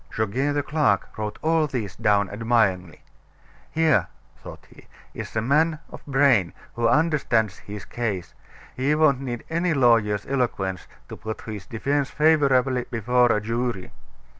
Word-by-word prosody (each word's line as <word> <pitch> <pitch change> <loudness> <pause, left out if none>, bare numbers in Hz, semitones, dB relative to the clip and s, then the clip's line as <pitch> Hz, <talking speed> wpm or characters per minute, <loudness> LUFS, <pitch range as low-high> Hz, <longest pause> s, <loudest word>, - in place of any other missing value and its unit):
Goguet, 130 +7 -1
the 145 - 0
clerk, 145 -10 0
wrote 105 -1 -4
all 160 -1 +2
this 115 -9 -4
down 105 -3 +2
admiringly. 100 -5 0 0.7
"Here," 160 -4 +2 0.3
thought - - -12
he, - - -18 0.3
"is - - -8
a 110 - 0
man 155 +5 +2
of - - -10
brain, 135 -10 +3 0.2
who 120 0 0
understands 140 - +1
his 105 -1 -9
case. 105 -7 -4 0.4
He 140 +4 +1
won't 145 -4 +3
need 120 -3 -5
any 170 0 0
lawyer's 115 -5 +3
eloquence 115 -8 -2 0.2
to - - -8
put 110 0 -6
his 105 -3 -8
defense 140 +4 -1
favorably 135 -5 +2
before 120 +1 +2
a 105 - +2
jury." 115 -2 -3
120 Hz, 140 wpm, -24 LUFS, 105-145 Hz, 0.7 s, brain